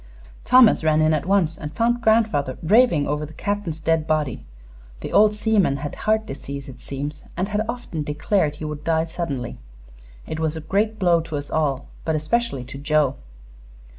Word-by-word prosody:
Thomas 250 Hz, -7 st, +6 dB
ran 155 Hz, -1 st, +3 dB
in 155 Hz, 0 st, +3 dB
at 155 Hz, +2 st, -1 dB
once, 185 Hz, -5 st, +2 dB
and 150 Hz, 0 st, -7 dB
found 240 Hz, +1 st, +1 dB
grandfather 215 Hz, -, +2 dB
raving 195 Hz, -, +4 dB
over 150 Hz, +1 st, -2 dB
the 150 Hz, 0 st, -9 dB
Captain's 200 Hz, -6 st, -3 dB
dead 160 Hz, 0 st, +1 dB
body. 150 Hz, -6 st, -1 dB, 0.6 s
The -, -, -6 dB
old 210 Hz, 0 st, +5 dB
seaman 210 Hz, -9 st, +2 dB
had 145 Hz, +1 st, -5 dB
heart 220 Hz, 0 st, 0 dB
disease, 140 Hz, -2 st, -7 dB
it 125 Hz, -2 st, -11 dB
seems, 145 Hz, +2 st, -6 dB
and 185 Hz, +3 st, -1 dB
had 210 Hz, +1 st, 0 dB
often 240 Hz, -10 st, -4 dB
declared 150 Hz, +2 st, 0 dB
he 155 Hz, -, -7 dB
would 150 Hz, -1 st, -5 dB
die 160 Hz, 0 st, +1 dB
suddenly. 150 Hz, -7 st, -4 dB, 0.7 s
It 160 Hz, -, -5 dB
was 160 Hz, 0 st, -1 dB
a -, -, -5 dB
great 205 Hz, +7 st, 0 dB
blow 175 Hz, -4 st, +3 dB
to 160 Hz, -2 st, -5 dB
us 145 Hz, 0 st, -7 dB
all, 145 Hz, -4 st, 0 dB, 0.2 s
but 160 Hz, -, 0 dB
especially 155 Hz, -, -1 dB
to 130 Hz, +2 st, -9 dB
Joe." 150 Hz, -2 st, +2 dB
160 Hz, 180 wpm, -22 LUFS, 150-205 Hz, 0.7 s, Thomas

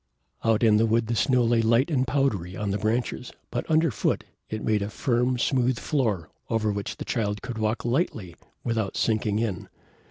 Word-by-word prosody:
Out 115 Hz, 0 st, +2 dB
in 110 Hz, -2 st, +6 dB
the 115 Hz, +1 st, +3 dB
wood 115 Hz, +1 st, +2 dB
the 115 Hz, +1 st, -1 dB
snow 125 Hz, +5 st, +3 dB
lay 115 Hz, 0 st, +3 dB
light 115 Hz, +7 st, +3 dB
and 130 Hz, -3 st, +1 dB
powdery 105 Hz, -11 st, 0 dB
on 105 Hz, -1 st, -2 dB
the 100 Hz, -, -1 dB
branches, 120 Hz, +4 st, -1 dB, 0.2 s
but 120 Hz, -, -3 dB
under 160 Hz, -1 st, +3 dB
foot 100 Hz, -, 0 dB, 0.3 s
it 110 Hz, -1 st, -4 dB
made 110 Hz, -2 st, +2 dB
a 100 Hz, -, -2 dB
firm, 125 Hz, +1 st, +1 dB
smooth 125 Hz, 0 st, +1 dB
floor, 110 Hz, -, -1 dB, 0.2 s
over 110 Hz, -1 st, +1 dB
which 100 Hz, 0 st, -4 dB
the -, -, -6 dB
Child 105 Hz, -3 st, -2 dB
could 115 Hz, -3 st, -5 dB
walk 110 Hz, +2 st, -1 dB
lightly 120 Hz, -, -1 dB, 0.3 s
without 110 Hz, -4 st, -1 dB
sinking 110 Hz, -2 st, +1 dB
in. 110 Hz, -6 st, -2 dB
115 Hz, 190 wpm, -26 LUFS, 105-125 Hz, 0.3 s, in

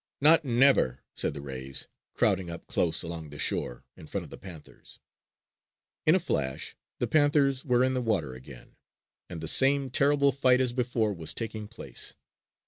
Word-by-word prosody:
"Not 160 Hz, +3 st, +5 dB
never!" 120 Hz, -, +2 dB
said -, -, -2 dB
the 70 Hz, -, -8 dB
rays, 65 Hz, -1 st, -5 dB, 0.3 s
crowding 95 Hz, -4 st, +1 dB
up 85 Hz, 0 st, -8 dB
close 85 Hz, -2 st, -1 dB
along 80 Hz, -2 st, -6 dB
the 75 Hz, -, -11 dB
shore -, -, 0 dB
in -, -, -13 dB
front -, -, -4 dB
of -, -, -13 dB
the -, -, -9 dB
panthers. 85 Hz, -6 st, -13 dB, 1.1 s
In 155 Hz, -, +6 dB
a -, -, +3 dB
flash, 70 Hz, -, -3 dB, 0.2 s
the -, -, -1 dB
panthers 145 Hz, -3 st, +2 dB
were 125 Hz, -2 st, +2 dB
in 130 Hz, 0 st, +1 dB
the 130 Hz, -, -1 dB
water 105 Hz, -, -1 dB
again, 65 Hz, 0 st, -13 dB, 0.5 s
and 85 Hz, -3 st, -7 dB
the 80 Hz, -, -2 dB
same 135 Hz, -, +6 dB
terrible 140 Hz, +1 st, +3 dB
fight 130 Hz, -1 st, +2 dB
as 125 Hz, -2 st, 0 dB
before 120 Hz, -4 st, -1 dB
was 80 Hz, -4 st, -3 dB
taking 110 Hz, -2 st, -4 dB
place. 105 Hz, -, -4 dB
115 Hz, 170 wpm, -27 LUFS, -, 1.1 s, In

